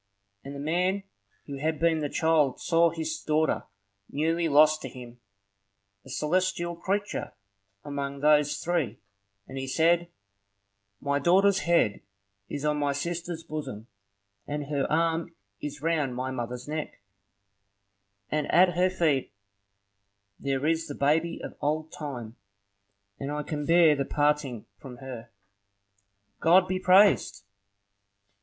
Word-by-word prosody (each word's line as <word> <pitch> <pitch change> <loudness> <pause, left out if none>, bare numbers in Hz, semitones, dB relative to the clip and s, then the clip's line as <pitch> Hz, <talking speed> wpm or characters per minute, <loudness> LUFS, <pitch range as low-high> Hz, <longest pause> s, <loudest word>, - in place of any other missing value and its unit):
And 140 +1 -8
the - - -6
man 180 +6 0 0.4
who 140 - -6
had 155 +3 -1
been 165 -1 +2
the 145 -1 -2
child 155 -5 +2
saw 170 0 +3
his 160 -1 -4
daughter, 155 +1 +1 0.4
newly 165 +3 0
lost 155 +1 +5
to 130 - -6
him, 120 -1 -11 0.8
a - - -14
celestial 175 +1 0
creature 200 +4 -3 0.5
among 140 -1 -4
those 150 -1 +4
three, 165 -10 -1 0.5
and 135 - -6
he 135 - -4
said, 170 +5 +2 0.9
"My 140 0 0
daughter's 190 +5 +4
head 170 - +2 0.5
is 145 +1 -4
on 150 0 +1
my 145 -1 0
sister's 170 +3 -4
bosom, 150 -10 -6 0.6
and 145 -1 -4
her 140 -2 -1
arm 165 +1 0 0.2
is 145 -1 -6
round 155 -6 0
my 130 +1 -3
mother's 125 0 -5
neck, 155 0 -5 1.3
and 150 -1 -1
at 180 +1 +5
her 180 +2 +3
feet 160 -7 0 1.1
there 135 0 -1
is 165 +1 +1
the 145 - -6
baby 155 +4 +1
of - - -6
old 155 +2 -1
time, 125 -7 -7 0.8
and 140 +1 -4
I 150 0 -3
can 150 -1 -4
bear 165 -2 +6
the 140 -1 -1
parting 145 -6 0
from 130 -3 -10
her, 120 -3 -8 1.1
God 180 +3 +5
be 185 0 -1
praised!" 190 - +4
150 Hz, 130 wpm, -27 LUFS, 140-170 Hz, 1.3 s, bear